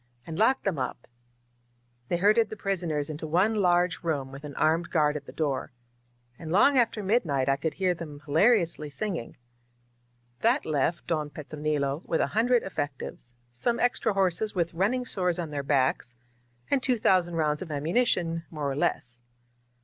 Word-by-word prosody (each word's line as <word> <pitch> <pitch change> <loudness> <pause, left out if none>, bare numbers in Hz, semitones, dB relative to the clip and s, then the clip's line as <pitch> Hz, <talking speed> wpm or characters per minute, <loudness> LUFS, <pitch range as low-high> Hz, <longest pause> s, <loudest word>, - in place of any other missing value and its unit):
"And 160 - -6
lock 260 +5 +3
them 185 -8 -1
up 125 -1 -4 0.5
!" 120 0 -41
They 175 - +1
herded 210 +4 +4
the - - -6
prisoners 170 -8 -2
into 155 +1 -6
one 185 +8 +2
large 180 -3 +2
room, 145 -5 -2
with 140 +2 -10
an 145 -1 -8
armed 165 +2 +1
guard 150 -3 +2
at 145 -2 -6
the - - -8
door. 140 -6 -2 0.7
And 160 -1 -6
long 240 +10 +5
after 230 -4 +2
midnight 170 - +1
I 135 - +3
could 155 +2 -3
hear 185 -1 +1
them 155 -4 -8
hilariously 165 -1 +2
singing. 175 - -4 1.0
That 240 +6 +2
left 155 +3 0
Don 155 -3 -1
Petronilo 150 0 -2
with 165 - -1
a - - +3
hundred 240 +2 +3
effectives, 145 -7 -5 0.2
some 235 - -1
extra 245 -3 +1
horses 195 +2 0
with 170 -2 0
running 215 +9 0
sores 180 -6 -1
on 165 -3 -4
their 145 -1 -2
backs, 130 -3 0 0.6
and 275 - +3
two 250 -1 +1
thousand 180 -5 +2
rounds 150 -2 0
of 185 - -6
ammunition, 165 - 0
more 150 -3 -3
or - - -3
less. 120 -4 -2
165 Hz, 170 wpm, -27 LUFS, 145-195 Hz, 1.0 s, long